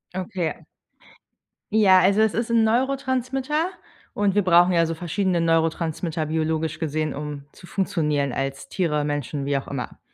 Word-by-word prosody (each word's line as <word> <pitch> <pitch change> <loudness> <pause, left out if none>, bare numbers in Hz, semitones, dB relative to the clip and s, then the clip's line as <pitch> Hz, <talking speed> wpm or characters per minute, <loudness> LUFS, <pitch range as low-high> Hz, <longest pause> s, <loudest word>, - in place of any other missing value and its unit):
Okay. 185 -3 -3 1.1
Ja, 200 -3 +6
also 195 +3 +4
es 220 -1 +3
ist 230 0 -2
'n 230 -1 +4
Neurotransmitter. 265 +5 0 0.5
Und 205 -2 +1
wir 205 - +3
brauchen 175 0 +5
ja 165 -1 +3
so 165 - -3
verschiedene 175 +2 -1
Neurotransmitter, 165 0 0
biologisch 160 0 -1
gesehen, 155 -1 -2
um 145 -1 -6
zu 175 - -15
funktionieren 150 -9 -1
als 135 +1 -4
Tiere, 150 -5 0
Menschen, 145 -1 -3
wie 140 0 0
auch 135 - -2
immer. 135 -3 -6
170 Hz, 150 wpm, -23 LUFS, 150-205 Hz, 1.1 s, Ja